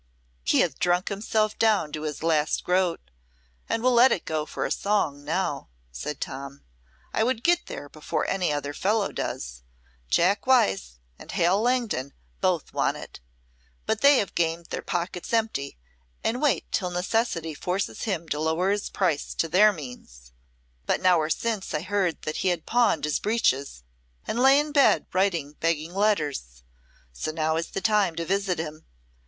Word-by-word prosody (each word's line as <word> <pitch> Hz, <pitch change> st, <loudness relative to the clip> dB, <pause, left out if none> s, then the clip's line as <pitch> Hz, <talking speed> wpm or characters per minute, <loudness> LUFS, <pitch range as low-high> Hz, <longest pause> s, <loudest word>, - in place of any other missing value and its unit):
"He -, -, +3 dB
hath -, -, -1 dB
drunk 180 Hz, +1 st, +1 dB
himself 215 Hz, +1 st, -1 dB
down 210 Hz, -9 st, +3 dB
to 150 Hz, -, -5 dB
his 155 Hz, 0 st, -4 dB
last 155 Hz, -2 st, +1 dB
groat, 180 Hz, -, 0 dB, 0.6 s
and 225 Hz, -, -1 dB
will 255 Hz, -, +4 dB
let 245 Hz, +2 st, +7 dB
it 175 Hz, -, -1 dB
go 155 Hz, -1 st, -2 dB
for -, -, -3 dB
a -, -, -3 dB
song 160 Hz, -9 st, 0 dB
now," -, -, -2 dB, 0.2 s
said 135 Hz, -, -5 dB
Tom. 140 Hz, +1 st, -6 dB, 0.5 s
"I 220 Hz, -, +2 dB
would 240 Hz, 0 st, 0 dB
get 345 Hz, 0 st, +2 dB
there 145 Hz, -, -7 dB
before 150 Hz, +1 st, -3 dB
any 185 Hz, -4 st, 0 dB
other 145 Hz, 0 st, -3 dB
fellow 205 Hz, +5 st, 0 dB
does. -, -, -5 dB, 0.5 s
Jack 195 Hz, -, +2 dB
Wyse 95 Hz, -, +3 dB, 0.3 s
and -, -, -10 dB
Hal 180 Hz, +5 st, +3 dB
Langton 235 Hz, -, 0 dB, 0.3 s
both -, -, 0 dB
want -, -, +1 dB
it, -, -, -10 dB, 0.7 s
but 220 Hz, 0 st, -1 dB
they 280 Hz, 0 st, +7 dB
have 200 Hz, -, -1 dB
gamed 165 Hz, 0 st, -1 dB
their -, -, -3 dB
pockets 175 Hz, 0 st, -4 dB
empty, 220 Hz, -12 st, -1 dB, 0.5 s
and 245 Hz, +3 st, -1 dB
wait 295 Hz, -3 st, +1 dB
till 180 Hz, -3 st, 0 dB
necessity 180 Hz, -2 st, -1 dB
forces 180 Hz, +6 st, -3 dB
him 170 Hz, -6 st, -2 dB
to 150 Hz, -, -1 dB
lower 160 Hz, +5 st, +1 dB
his 205 Hz, 0 st, -1 dB
price 175 Hz, -7 st, -1 dB
to 165 Hz, -, 0 dB
their 200 Hz, +6 st, +6 dB
means. 125 Hz, -, -11 dB, 0.6 s
But -, -, +1 dB
an -, -, -8 dB
hour 170 Hz, -4 st, +4 dB
since 215 Hz, -2 st, -2 dB
I 150 Hz, -, -1 dB
heard 185 Hz, -2 st, -1 dB
that 155 Hz, -, -3 dB
he -, -, -1 dB
had 175 Hz, -3 st, 0 dB
pawned 235 Hz, -9 st, +2 dB
his 150 Hz, -, 0 dB
breeches 140 Hz, -, 0 dB, 0.4 s
and 235 Hz, -, -2 dB
lay 270 Hz, +2 st, +6 dB
in 300 Hz, 0 st, -2 dB
bed 285 Hz, -2 st, +4 dB
writing 170 Hz, -6 st, 0 dB
begging 165 Hz, 0 st, -1 dB
letters. 150 Hz, -, -1 dB, 0.5 s
So 60 Hz, -, -4 dB
now 160 Hz, 0 st, 0 dB
is 165 Hz, +1 st, -1 dB
the -, -, -5 dB
time 210 Hz, -6 st, +2 dB
to 165 Hz, -, -3 dB
visit 195 Hz, 0 st, 0 dB
him. 155 Hz, -1 st, -6 dB
175 Hz, 170 wpm, -26 LUFS, 150-210 Hz, 0.7 s, let